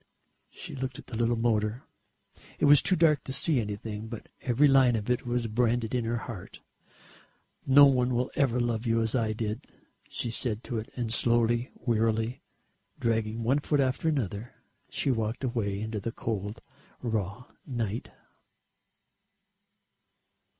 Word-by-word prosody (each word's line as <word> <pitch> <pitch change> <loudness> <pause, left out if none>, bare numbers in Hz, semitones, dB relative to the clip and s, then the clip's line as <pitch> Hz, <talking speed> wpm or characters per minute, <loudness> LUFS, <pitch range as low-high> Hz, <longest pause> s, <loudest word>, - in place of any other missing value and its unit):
She - - -9
looked 130 -1 -4
at - - -11
the 115 - -8
little 120 +1 +2
motor. 115 +1 0 0.7
It - - +2
was 145 -1 +7
too 185 - +2
dark 155 -4 +3
to - - -4
see 135 0 +2
anything, 105 +1 -5
but 115 -1 -8
every 130 +4 +4
line 135 -3 +5
of 110 +2 -1
it 125 +1 -1
was 120 -1 0
branded 115 +1 +1
on 120 -2 0
her 115 +1 0
heart. 110 -7 -8 1.1
"No 140 +2 +9
one 125 -2 +3
will 125 +1 0
ever 125 -4 +1
love 120 -1 -1
you 115 0 +2
as 110 -1 0
I 115 -3 +1
did," 110 0 -4 0.4
she 120 - -3
said 115 -1 0
to 120 -4 -3
it 110 - -7
and 120 -3 -2
slowly, 120 0 +2
wearily, 115 +1 0 0.6
dragging 115 0 0
one 130 +5 +2
foot 145 0 0
after 135 +4 +1
another, 115 - -3 0.3
she 140 - 0
walked 115 +1 -2
away 110 -6 -1
into 110 0 -3
the 115 +3 -4
cold 110 -1 -4 0.4
raw 110 0 -2 0.2
night. 115 -4 -3
120 Hz, 150 wpm, -28 LUFS, 110-125 Hz, 1.1 s, No